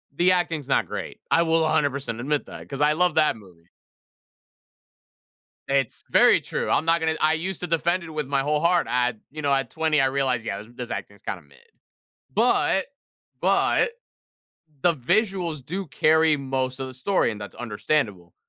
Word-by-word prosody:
The 180 +3 +4
acting's 165 -6 0
not - - +1
great. - - -6
I 165 - +4
will 165 0 +2
100% 140 -6 0
admit 145 +4 -1
that, - - -10
'cause 140 0 -5
I 150 +1 +4
love 180 0 +1
that 155 -5 +3
movie. 90 -5 -18 2.0
It's 135 -3 -1
very - - +5
true. - - -3
I'm - - +2
not 165 +1 +3
gonna 160 0 0
I 155 +1 +4
used 180 +4 -3
to 180 - -3
defend 170 +2 +1
it 165 - -9
with 150 -3 -3
my 140 -1 +1
whole 150 +2 0
heart. 170 +1 +2
I 125 0 +1 0.2
you 155 - -6
know, 140 -1 +1
at 135 -3 0
20, 160 0 +1
realized, 130 -3 0
"Yeah, 100 - -3
this 105 +2 -10
this 125 -1 -6
acting 100 - -5
is - - -23
kind 90 - -4
of 75 - -22
mid." 70 - -21 0.8
But 220 -4 +2 0.6
but, - - +2 0.9
the 175 -1 +4
visuals 175 - 0
do 190 +3 -4
carry 155 +1 +3
most 130 -1 -2
of 130 - -3
the 130 - -9
story, 130 +1 +1
and 105 - -9
that's 105 - -8
understandable. 105 - -2
150 Hz, 180 wpm, -24 LUFS, 125-165 Hz, 2.0 s, very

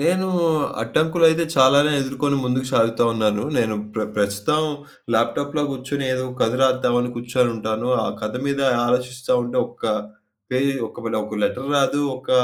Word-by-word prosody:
నేను 180 +5 +1 0.6
అడ్డంకులు 160 +8 +1
అయితే 160 +1 +2
చాలానే 140 +3 +6
ఎదుర్కొని 140 +1 -1
ముందుకు 130 +1 -1
సాగుతా 115 -1 +3
ఉన్నాను. 105 -2 0 0.2
నేను 110 -2 +1 0.2
ప్ర 110 - -1
ప్రస్తుతం 105 +9 +1 0.5
ల్యాప్‌టాప్‌‍‌లో 145 +6 0
గూర్చొని 135 +1 -4
ఏదో 130 0 -2
కథ 115 - +2
రాద్దాం 130 -2 +2
అని 125 0 -2
కూర్చొని 120 +1 0
ఉంటాను. 110 +3 -2 0.2
ఆ - - -1
కథ 105 0 -3
మీద 140 0 -1 0.3
ఆలోచిస్తా 125 +1 0
ఉంటే 120 - -3
ఒక్క 120 0 -12 0.7
పేజీ, 135 +2 +1
ఒకవేళ 115 -2 -5
ఒక 105 0 -6
లెటర్ 135 +2 -2
రాదు, 140 +1 +2 0.2
ఒక 130 +1 -9
125 Hz, 150 wpm, -21 LUFS, 115-140 Hz, 0.7 s, చాలానే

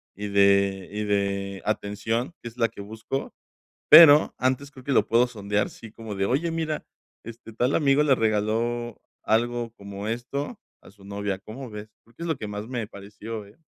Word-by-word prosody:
y 105 +1 -5
de 100 -1 +3
y 105 +1 -3
de 100 -1 -1
atención, 110 - -2
que 120 - -6
es 115 - -19
la 115 -2 +3
que 105 - -10
busco, 110 +6 -5 0.6
pero, 155 -1 +9
antes 130 +2 0
creo 130 -1 -14
que 140 - -2
lo - - +3
puedo 115 +2 +4
sondear, 105 -3 -1
sí, 115 - -12
como 110 -1 -8
de: 95 0 0
"Oye, 155 +8 0
mira, 160 -2 -3 0.4
este 115 0 -10
tal 125 +5 +1
amigo 145 -1 +3
le 145 -3 +4
regaló 115 +2 -1 0.2
algo 120 +1 0
como 100 -1 -8
esto 140 - -4 0.2
a - - -16
su 100 0 -20
novia, 100 -1 -3
¿cómo 125 +6 -9
ves?", 105 0 -8
creo 115 0 -26
que 170 - -8
es - - -3
lo 160 - 0
que 105 - -6
más 105 +1 -6
me 120 -3 -3
pareció, 105 +2 -8
eh. 105 - -20
110 Hz, 195 wpm, -25 LUFS, 100-125 Hz, 0.6 s, pero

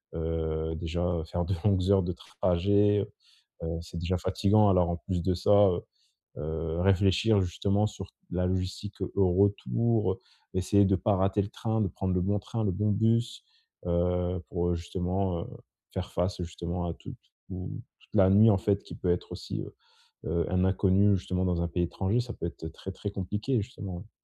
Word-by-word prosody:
heu, 80 -1 -2
déjà, 85 +1 -3 0.2
heu, - - -4
faire 85 +1 -2
de 95 - -1
longues 95 -2 +3
heures 95 -1 +5
de 90 +1 -2 0.3
trajet, 100 +3 +3 0.6
heu, 80 - -2
c'est 85 0 -8
déjà 90 +2 0
fatigant 100 +3 +3
alors, 90 -2 +3
en 85 - -1
plus 90 -2 -3
de 90 - +2
ça, 90 - -1
heu 100 -4 +5 0.6
heu, 80 +2 -3
réfléchir, 100 +2 +3
justement, 100 +3 +1
sur 100 -2 -8
t - - -26 0.2
la 90 +1 0
logistique 95 +2 -3 0.2
au 95 -2 +3
retour, 100 +2 +2
heu, - - -12 0.3
essayer 100 +2 +3
de 95 0 +3
pas 105 -1 +2
rater 95 +2 +2
le - - -5
train, 110 -1 -1
de 100 - +2
prendre 95 +2 -2
le 90 - +2
bon 100 +3 +1
train, 110 +3 -4
le 100 - +1
bon 105 +4 0
bus, 115 +3 +1 0.4
heu, 90 +1 +1
pour, 85 -1 -1
heu, - - +1
justement, 90 +1 -2
heu, - - -7 0.5
faire - - -4
face, 90 +2 -1
justement, 85 +1 -4
à 85 - -2
tout - - -10 0.3
tout 90 -1 -6 0.2
toute - - -17
la 95 -2 +6
nuit, 105 +3 +7
en 100 - +3
fait, 100 0 +1
qui - - -11
peut 90 - -2
être 90 - -2
aussi, - - -5
heu - - -8 0.5
heu, 85 -1 0
un 90 0 +2
inconnu, 100 +1 +4
justement, 90 0 -2
dans 90 -2 0
un 85 - -1
pays 90 +1 -1
étranger, 95 +7 0
ça 120 -1 -5
peut 85 - -4
être 80 -1 -6
très, 95 +4 -8
très 100 +2 -5
compliqué, 105 +6 -1
justement, 100 -5 -7
hein. - - -21
95 Hz, 200 wpm, -29 LUFS, 85-100 Hz, 0.6 s, nuit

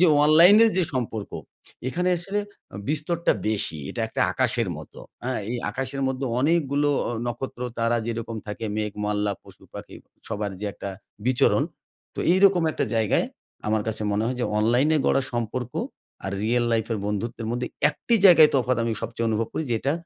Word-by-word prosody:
যে 180 - +7 0.2
অনলাইন 170 +7 +8
এর 225 - +4
যে - - +4
সম্পর্ক, 110 -4 -3 0.6
এখানে 180 +7 -1
আসলে 195 +4 -2 0.5
বিস্তরটা 155 +3 +1 0.2
বেশি। 100 -7 -1
এটা - - -5
একটা - - -4
আকাশের - - 0
মতো। - - -11 0.3
আ - - -1 0.2
এই 125 - -1
আকাশের 135 +1 -4
মধ্যে 130 +1 -3 0.2
অনেকগুলো 145 -1 +2 0.2
অ - - -2 0.2
নক্ষত্র 120 +1 -5 0.2
তারা 115 +1 +2
যেরকম 115 -1 -4
থাকে 105 +2 -5
মেঘ, 105 -1 -2
মল্লা, 105 0 0
পশু-পাখি - - -12 0.3
সবার 105 0 -2
যে 105 - -3
একটা 100 - -6 0.4
বিচরণ 130 -1 +3 0.5
তো - - -13
এইরকম 190 -1 +5
একটা - - -1
জায়গায় 110 -2 +2 0.4
আমার 110 0 +1
কাছে 110 0 -2
মনে 105 +2 0
হয় 125 +1 -2
যে - - +1
অনলাইনে 125 +8 +3
গড়া 135 - +3
সম্পর্ক 120 +1 -3 0.5
আর 95 - -3
রিয়েল 120 +2 +2
লাইফ 110 -1 +1
এর 110 - -1
বন্ধুত্বের 110 +3 -3
মধ্যে 120 +1 -2 0.2
একটি 235 - -1
জায়গায় 165 -5 +9
তফাৎ 130 -2 +2
আমি 115 - 0
সবচেয়ে 115 0 -2
অনুভব 110 0 0
করি 160 - -2
যেটা 125 +5 0
120 Hz, 170 wpm, -25 LUFS, 110-145 Hz, 0.6 s, জায়গায়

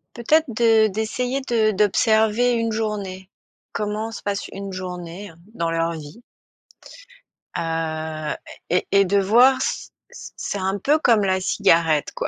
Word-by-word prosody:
Peut-être 310 +7 +2
de 225 -1 +3
d'essayer 235 +6 -2
de 230 -4 +1
d'observer 220 +3 +2
une 230 -1 0
journée. 200 -4 -4 0.4
Comment 210 +2 -3
se - - -9
passe 200 -1 -3
une 195 0 -7
journée, 180 +1 -7
hein, 165 - -17 0.2
dans 170 -6 -2
leur 165 0 0
vie? 155 +9 -10 1.4
Heu, 160 -2 -3 0.3
et 180 - +1
et 200 0 +5
de 200 +2 +1
voir 245 +7 +5
c - - -3 0.2
c - - -10
c'est 205 - -4
un 190 +1 -1
peu 295 +9 +3
comme 230 -7 +4
la 190 -1 +1
cigarette, 165 -4 +2
quoi. - - -2
205 Hz, 145 wpm, -22 LUFS, 175-225 Hz, 1.4 s, et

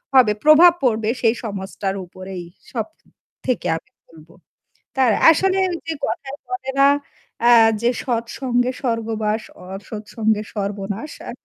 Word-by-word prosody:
হবে। 245 -5 +6
প্রভাব 320 +3 +8
পড়বে 220 -3 +1
সেই 230 0 +3
সমাজটার 195 -2 -4
উপরেই 185 0 -8 0.3
সব 225 -4 -2 0.6
থেকে 255 -2 -1
আমি - - -14 0.2
বলবো। 165 0 -17 0.6
তার 260 -3 +4 0.2
আসলে 380 +4 +3
ওই 345 - -2
যে 325 - -1
কথায় 280 -5 -4
বলে 375 -8 -4
না? 275 - +7 0.6
আ - - +7 0.3
যে, 235 - +3
"সৎসঙ্গে 245 +1 -1
স্বর্গবাস, 225 -3 -1 0.3
অসৎ 210 +2 -7
সঙ্গে 220 -2 +1
সর্বনাশ।" 205 +5 -4 0.2
আ - - -5
225 Hz, 130 wpm, -21 LUFS, 205-265 Hz, 0.6 s, প্রভাব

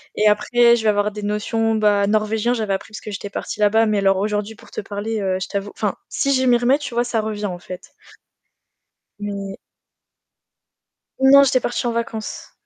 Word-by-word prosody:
Et 215 - +3
après, 235 +3 +4
je 220 - -4
vais 215 - +3
avoir 205 0 +1
des 210 0 -7
notions 220 +2 0
bah 205 -2 +2
norvégien 215 +2 +1
j'avais 215 -4 -1
appris 195 +3 -5
parce - - -7
que 215 - -7
j'étais 205 0 -6
partie 200 - -6
là-bas, 220 +2 +4
mais 215 -1 +1
alors 195 -1 +3
aujourd'hui 210 +2 -2
pour - - -18
te - - -4
parler, 205 +2 -4 0.2
je - - -3
t'avoue, 200 0 -4
enfin, 210 -3 -1
si 275 0 0
je 260 - +2
m'y 245 -1 +5
remets, 250 +4 +2
tu 280 -4 -6
vois, 240 +1 +1
ça 240 -2 -1
revient 210 -1 -4
en 180 -3 -4
fait. 180 +1 -10 1.3
Mais 200 -1 -5 1.6
Non, 275 +1 +7
j'étais 255 -1 +2
partie 240 +1 -2
en 235 - 0
vacances. 230 -2 -5
215 Hz, 195 wpm, -20 LUFS, 205-235 Hz, 1.6 s, Non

